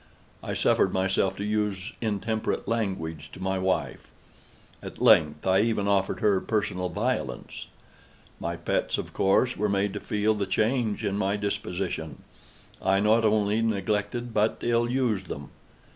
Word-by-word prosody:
I -, -, -4 dB
suffered -, -, +3 dB
myself 95 Hz, 0 st, +1 dB
to 100 Hz, -, -3 dB
use 105 Hz, -2 st, -1 dB
intemperate 110 Hz, 0 st, -2 dB
language 80 Hz, -9 st, -2 dB
to -, -, -10 dB
my 95 Hz, 0 st, -1 dB
wife. 95 Hz, 0 st, -1 dB, 0.7 s
At -, -, -9 dB
length, 75 Hz, -1 st, +4 dB
I 95 Hz, 0 st, +4 dB
even 105 Hz, -2 st, +1 dB
offered 95 Hz, -2 st, +1 dB
her 100 Hz, -3 st, +3 dB
personal 100 Hz, -4 st, -1 dB
violence. 105 Hz, -, -3 dB, 0.7 s
My 85 Hz, -, -3 dB
pets, 85 Hz, -, -1 dB
of -, -, -6 dB
course, 110 Hz, +6 st, +2 dB
were 105 Hz, +1 st, 0 dB
made 100 Hz, 0 st, 0 dB
to 105 Hz, -, -4 dB
feel 105 Hz, +1 st, +1 dB
the 100 Hz, -2 st, -2 dB
change 110 Hz, +2 st, 0 dB
in 100 Hz, 0 st, -1 dB
my 100 Hz, +1 st, +1 dB
disposition. 90 Hz, -6 st, -3 dB, 0.6 s
I 95 Hz, 0 st, +3 dB
not 110 Hz, +3 st, +3 dB
only 105 Hz, 0 st, +2 dB
neglected, 110 Hz, +3 st, -1 dB
but 110 Hz, +1 st, +2 dB
ill 120 Hz, 0 st, +2 dB
used 120 Hz, -7 st, 0 dB
them. 70 Hz, -1 st, -7 dB
100 Hz, 145 wpm, -27 LUFS, 95-110 Hz, 0.7 s, length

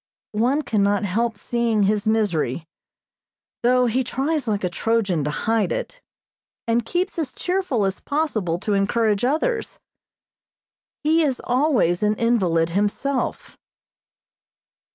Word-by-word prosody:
One 250 Hz, +8 st, +1 dB
cannot 205 Hz, -3 st, +1 dB
help 225 Hz, +3 st, -1 dB
seeing 230 Hz, -1 st, 0 dB
his 205 Hz, +1 st, +1 dB
misery, 175 Hz, -, 0 dB, 1.0 s
though 250 Hz, +1 st, +3 dB
he 250 Hz, +2 st, +1 dB
tries 275 Hz, +2 st, -2 dB
like 210 Hz, -2 st, -1 dB
a -, -, +2 dB
Trojan 200 Hz, -6 st, 0 dB
to -, -, 0 dB
hide 220 Hz, +8 st, 0 dB
it, -, -, -4 dB, 0.7 s
and 230 Hz, +1 st, +2 dB
keeps 355 Hz, -, -2 dB
as 310 Hz, -, -2 dB
cheerful 355 Hz, -, -1 dB
as 195 Hz, 0 st, -2 dB
possible 235 Hz, -, -1 dB
to 210 Hz, -, -1 dB
encourage 205 Hz, +1 st, +1 dB
others. 320 Hz, -, 0 dB, 1.3 s
He 320 Hz, +2 st, +3 dB
is 275 Hz, -5 st, 0 dB
always 250 Hz, -, +2 dB
an 210 Hz, 0 st, +2 dB
invalid 185 Hz, -9 st, +1 dB
himself. 210 Hz, +8 st, -2 dB
230 Hz, 120 wpm, -22 LUFS, 200-270 Hz, 1.3 s, though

